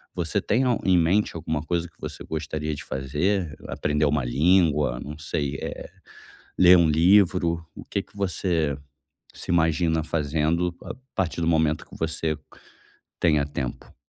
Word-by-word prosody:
Você - - -1
tem 120 +5 +1
al 125 -2 +1
em 95 -1 +4
mente, 85 +4 +2
alguma 80 -2 -3
coisa 85 +1 -1
que - - -25
você - - -7
gostaria 75 -1 -3
de 70 - -8
fazer? 75 +6 -1
Aprender 75 +1 0
uma 70 -2 +1
língua? 75 0 +2
Não 75 +1 -8
sei, 70 -2 -3
eh, - - -6 0.7
ler 90 0 +8
um 85 -2 +4
livro? 85 0 +3
O - - -10
que 100 - -2
que - - -24
você 85 -6 0 0.6
se - - -8
imagina 80 -1 +2
fazendo 80 +3 0
a - - -6 0.2
partir 85 -2 -1
do 80 - 0
momento 80 -2 +1
que - - -13
você 80 -1 -2 0.8
tenha 75 -4 +3
tempo? 65 -3 -6
80 Hz, 155 wpm, -25 LUFS, 75-90 Hz, 0.8 s, ler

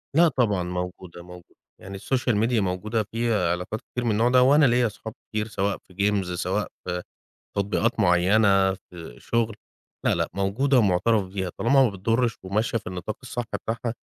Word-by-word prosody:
لا 170 +2 +6
طبعًا 115 - +1
موجودة، 90 0 -6
موجودة. 90 0 -14 0.3
يعني 95 +1 -8
الSocial 125 +3 0
Media 115 0 +2
موجودة 105 +3 -1
فيها 115 -7 +1
علاقات 90 +5 -3
كتير 125 - -3
من 115 - +2
النوع 115 +3 +2
ده، 125 0 +5
وأنا 145 +3 +5
ليَّ 120 -1 +3
صحاب 110 +1 -9 0.2
كتير 105 0 -2
سواء 100 -2 -1
في 90 - -22 0.2
Games 100 -2 0
سواء 90 - -1 0.2
في 90 0 -2 0.6
تطبيقات 105 +4 0
معيّنة، 95 +1 +4
في 85 -7 -12
شغل، 115 -2 -1 0.5
لا - - +3
لأ - - -1
موجودة 110 +8 +2
ومُعترَف 105 +1 +3
بيها 95 -1 -4
طالما 135 +3 +4
ما - - +3
بتضرش 115 +4 0
وماشية 105 +5 -1
في 105 - -16
النطاق 90 +3 -5
الصح 125 -1 -4
بتاعها، 115 +1 -3
105 Hz, 170 wpm, -25 LUFS, 95-115 Hz, 0.6 s, لا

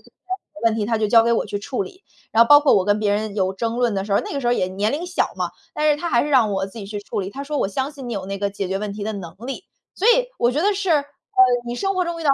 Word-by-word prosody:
的 - - -22 0.5
问 225 -1 +4
题 215 -2 -1
他 225 0 0
就 215 - +1
交 230 +1 +6
给 235 +1 +2
我 230 - 0
去 205 - -3
处 210 - -3
理， 385 0 -11 0.3
然 225 - +7
后 235 - +1
包 290 0 +9
括 295 - +4
我 190 - +3
跟 205 +1 +2
别 210 -1 +1
人 210 0 -2
有 190 -2 0
争 230 +4 -2
论 240 -3 +1
的 195 0 -1
时 205 - -4
候 - - +4
儿， - - -1
那 - - -6
个 280 - -2
时 245 - -3
候 - - +3
儿 - - +3
也 185 - 0
年 200 +4 -1
龄 325 +5 -3
小 355 - -1
嘛， - - -2 0.2
但 305 0 +2
是 295 - +3
他 345 - -2
还 235 - +3
是 295 - -3
让 250 -6 +4
我 195 0 -1
自 200 +4 -11
己 200 - -7
去 205 0 -5
处 205 - -4
理， 190 0 -5
他 275 +7 -6
说 295 0 -2
我 195 - +1
相 265 +7 -2
信 270 -4 -8
你 235 - -4
有 195 -3 -4
那 195 0 -4
个 200 0 -1
解 195 -2 -4
决 195 - -1
问 210 0 -4
题 205 0 -5
的 220 - -2
能 175 -5 -7
力。 270 - -5 0.3
所 405 - -1
以 - - +4
我 240 - +3
觉 290 - 0
得 415 - +3
是， 385 -2 -2
呃， 295 -3 +3 0.6
你 240 - -3
生 390 +9 -1
活 365 -1 +1
中 340 -1 -4
遇 325 - -6
到， 285 - +4
230 Hz, 375 characters per minute, -22 LUFS, 205-290 Hz, 0.6 s, 包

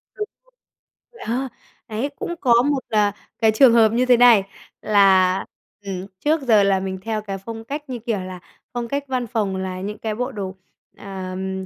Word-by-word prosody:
Đúng 420 - -4 0.2
rồi. - - -32 0.7
Ờ, 255 +4 -1 0.4
đấy, 225 +6 -2
cũng 345 - -4
có 240 -3 +5
một, 285 -1 0
ờ, 210 -2 +3 0.3
cái 220 -1 +4
trường 235 +2 +6
hợp 225 -2 +6
như 250 +2 +2
thế 250 -1 +5
này 235 -4 +7 0.4
là, 190 -3 +4 0.4
ừm, 195 -1 -5
trước 310 +1 +1
giờ 225 -6 +4
là 195 -1 +3
mình 190 0 -4
theo 220 0 -2
cái 195 -2 -5
phong 225 +3 -8
cách, 290 +4 -6
như 250 -2 -4
kiểu 220 -3 -2
là, 185 0 -7 0.3
phong 240 -1 -3
cách 280 +4 -2
văn 255 -2 -2
phòng 210 -4 -1
là 185 -1 -4
những 205 +2 -5
cái 215 -1 -3
bộ 250 +3 -2
đồ, 195 -5 -5 0.4
ờ, 190 -2 -7
ừm, 190 0 -4
220 Hz, 195 wpm, -22 LUFS, 195-245 Hz, 0.7 s, này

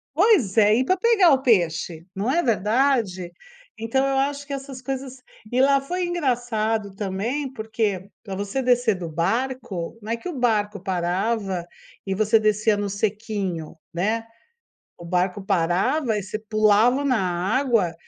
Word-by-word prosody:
Pois 325 - +3
é, 210 0 +6
ir 255 - +1
pra 370 - +2
pegar 405 -4 +5
o 265 - +2
peixe, 170 -7 +1
não 205 +6 -1
é 340 +5 +2
verdade? 215 -5 +1 0.5
Então 230 +5 0
eu 270 0 0
acho 280 +1 -1
que 280 - -5
essas 270 -1 -7
coisas 265 0 -5 0.3
e 255 +2 +2
lá 275 0 +5
foi 355 +6 -3
engraçado 235 - -1
também, 220 +8 -3
porque 220 -5 -2
pra 195 -3 -6
você 205 +7 -2
descer 245 -3 +2
do 180 -2 -6
barco, 210 +2 -2
não 220 +2 -6
é 235 - 0
que 230 - -8
o 355 - -4
barco 210 -4 +1
parava 190 +1 -1 0.4
e 195 -1 -2
você 215 +2 +3
descia 215 0 +2
no 205 0 -2
sequinho, 200 -5 -3 0.2
né, 220 +6 -1 0.7
o 170 - -11
barco 180 +3 0
parava 195 - +1
e - - -2
você 205 +3 -4
pulava 215 +4 +3
na 255 -3 +2 0.4
água, 230 -11 +1
220 Hz, 155 wpm, -23 LUFS, 195-265 Hz, 0.7 s, é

